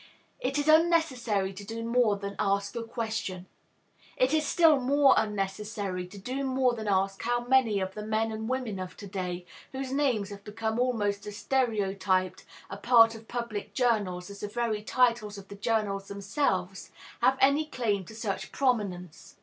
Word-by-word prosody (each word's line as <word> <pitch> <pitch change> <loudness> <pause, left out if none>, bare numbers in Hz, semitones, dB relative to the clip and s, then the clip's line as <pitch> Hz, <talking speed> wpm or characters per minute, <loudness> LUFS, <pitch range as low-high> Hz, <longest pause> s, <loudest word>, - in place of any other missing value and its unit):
It 270 +3 -1
is 290 +1 -1
unnecessary 290 - +3
to 195 +2 -9
do 225 +3 -6
more 230 -2 +3
than 200 0 -6
ask 200 -1 0
the 235 - -3
question. 220 -5 -4 0.7
It 255 +3 +2
is 310 -1 +2
still 325 -5 +5
more 275 +2 +5
unnecessary 200 -2 -2
to 200 - -12
do 255 +8 -4
more 260 -2 +2
than 220 -2 -5
ask 195 0 +1
how 240 +1 -1
many 245 -5 +3
of 190 0 -3
the 210 - -6
men 220 +1 0
and 220 +1 -4
women 250 -7 -2
of 185 0 -7
to 205 - -9
day, 180 -2 -4 0.3
whose 265 0 -4
names 255 -8 0
have 200 0 -9
become 220 +2 -3
almost 210 -5 0
as 205 0 -6
stereotyped 195 -8 0 0.2
a 195 - -7
part 230 +1 +6
of 225 0 -12
public 215 -4 -5
journals 200 -7 0
as 200 - -10
the 210 - -4
very 220 -1 -1
titles 230 -3 +1
of 195 -1 -11
the 200 - -8
journals 200 -2 -1
themselves, 195 -2 -2 0.3
have 265 - +4
any 280 +3 +4
claim 220 -9 -1
to 220 - -11
such 220 -3 -4
prominence. 195 - -2
220 Hz, 175 wpm, -28 LUFS, 195-250 Hz, 0.7 s, part